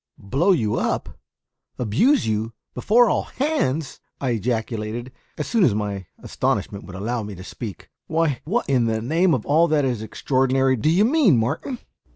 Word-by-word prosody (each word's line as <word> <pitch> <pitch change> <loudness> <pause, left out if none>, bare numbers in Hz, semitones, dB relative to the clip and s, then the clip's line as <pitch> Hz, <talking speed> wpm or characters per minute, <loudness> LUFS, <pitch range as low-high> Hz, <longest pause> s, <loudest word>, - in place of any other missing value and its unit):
"Blow 140 - +1
you 110 - +1
up? - - -2 0.6
abuse 125 - +2
you? 110 +1 -1 0.2
before 230 - +4
all - - +1
hands?" 165 - -2 0.2
I 130 -3 -1
ejaculated, 115 +1 -2 0.3
as 150 - -2
soon 225 -4 +2
as 120 - +4
my 100 -3 -3
astonishment 100 - -2
would 95 - -10
allow 115 +5 -2
me 105 -1 -7
to 90 - -10
speak. 105 +2 -8 0.2
"Why, 155 -5 0
what 225 +10 -1
in 130 -4 +2
the 110 -1 0
name 160 +9 +2
of 115 - -4
all 160 +4 +4
that 150 -3 +2
is 120 -4 -1
extraordinary 130 +3 +1
do 130 +6 +1
you 185 +6 +4
mean, 250 - +4
Martin?" 145 - -2
130 Hz, 170 wpm, -22 LUFS, 110-165 Hz, 0.6 s, before